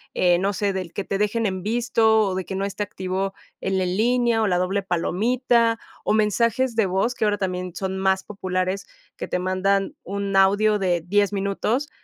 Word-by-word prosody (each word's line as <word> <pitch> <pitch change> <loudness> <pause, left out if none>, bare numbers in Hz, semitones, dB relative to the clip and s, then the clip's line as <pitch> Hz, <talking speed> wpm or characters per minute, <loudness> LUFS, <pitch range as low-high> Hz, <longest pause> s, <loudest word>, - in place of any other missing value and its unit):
eh, 175 -1 +4
no 195 +2 0
sé, 200 +1 0
del 185 -3 -5
que 200 - -3
te 195 - -2
dejen 210 +3 0
en 190 -1 -3
visto 225 0 +2
o 195 -3 0
de 185 -1 -3
que 190 - -5
no 195 - -2
esté 200 +1 -3
activo 190 0 -3 0.3
el 190 0 0
en 180 0 -1
línea 235 0 +2
o 215 - +2
la 180 -2 +2
doble 190 +2 0
palomita, 230 +6 +1 0.3
o - - +2
mensajes 230 +3 +1
de 220 -2 +3
voz 190 +6 0
que 220 - 0
ahora 205 -1 +1
también 180 -2 -3
son 190 -1 -3
más 190 0 +1
populares, 185 -1 -3 0.3
que - - -5
te - - -1
mandan 190 +2 0
un 200 +1 -3
audio 205 +2 +4
de 180 -3 +1
10 205 +2 +2
minutos. 205 +8 -1
195 Hz, 200 wpm, -23 LUFS, 185-220 Hz, 0.3 s, eh